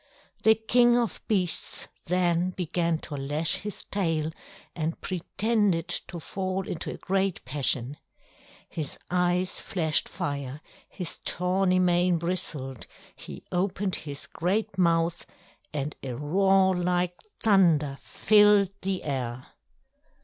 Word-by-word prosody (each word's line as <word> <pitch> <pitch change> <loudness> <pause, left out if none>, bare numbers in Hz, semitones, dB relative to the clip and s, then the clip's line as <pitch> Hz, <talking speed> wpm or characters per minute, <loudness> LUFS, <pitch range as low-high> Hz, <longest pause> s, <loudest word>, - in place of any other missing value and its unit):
The 220 0 +6
King 240 +2 +4
of 235 -7 -1
Beasts 185 -5 -1 0.2
then 175 0 +2
began 170 -2 0
to 150 - -6
lash 145 +3 0
his 210 0 -6
tail 165 -5 0 0.4
and 165 0 -2
pretended 190 -1 0
to 175 - -2
fall 185 +3 -3
into 160 - -4
a - - -7
great 195 -1 -1
passion. 130 0 -1 0.7
His 155 -4 -5
eyes 180 +1 +1
flashed 160 -7 +1
fire, 140 -1 -4 0.3
his 180 -3 -6
tawny 185 +1 +1
mane 180 -1 +3
bristled; 155 -7 -3 0.3
he - - -9
opened 190 +1 0
his 145 -2 -7
great 195 +5 -1
mouth, 170 -2 +1 0.4
and 150 0 -3
a 130 -3 -5
roar 190 +6 +3
like 180 0 +1 0.3
thunder 165 -9 +3
filled 205 -2 +5
the 190 -1 -2
air. 130 -3 -3
180 Hz, 115 wpm, -27 LUFS, 155-190 Hz, 0.7 s, The